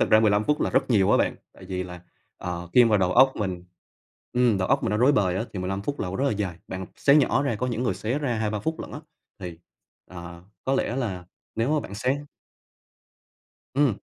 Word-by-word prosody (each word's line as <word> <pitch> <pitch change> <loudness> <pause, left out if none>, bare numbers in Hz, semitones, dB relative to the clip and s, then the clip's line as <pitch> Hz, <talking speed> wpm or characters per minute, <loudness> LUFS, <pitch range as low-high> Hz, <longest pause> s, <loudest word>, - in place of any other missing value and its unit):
Thực - - +2
ra 110 - +7
15 105 -1 +3
phút 150 +4 +1
là - - +1
rất - - +1
nhiều 100 -5 +4
á - - +6
bạn. - - +1 0.2
Tại 95 - -14
vì 90 -1 -3
là, 90 -1 -9 0.4
ờ, 85 -1 -5
khi 125 - +7
vào 110 -3 +3
đầu 90 -1 +2
óc 130 +4 +6
mình 90 -4 -3 0.7
ừm, 120 -4 +3
đầu 95 - -1
óc 135 +1 +2
mình - - 0
nó 105 - +1
rối 125 +6 +5
bời 95 -7 +2
á 110 - -1
thì 100 - -5
15 95 +2 -3
phút 145 +6 -3
là - - -2
rất 135 - +1
là 140 - +2
dài. 100 -5 -3
Bạn 95 0 -5
xé 140 - +4
nhỏ 140 -2 +4
ra 135 -5 0
có 125 - -2
những 120 -1 -2
người 125 - 0
xé 120 +6 -2
ra 135 -5 -1
2-3 110 -1 -1
phút 160 +9 -3
lận - - -7
á, 150 - -6 0.4
thì, 90 -4 -7 0.5
ờ, 85 -1 -9 0.2
có 135 - +1
lẽ 125 - 0
là 100 -9 -3 0.3
nếu 120 +7 +1
mà 150 - +2
bạn 100 - -8
xé 130 +7 0 1.5
Ừm. 135 -6 +2
110 Hz, 240 wpm, -25 LUFS, 95-130 Hz, 1.5 s, ra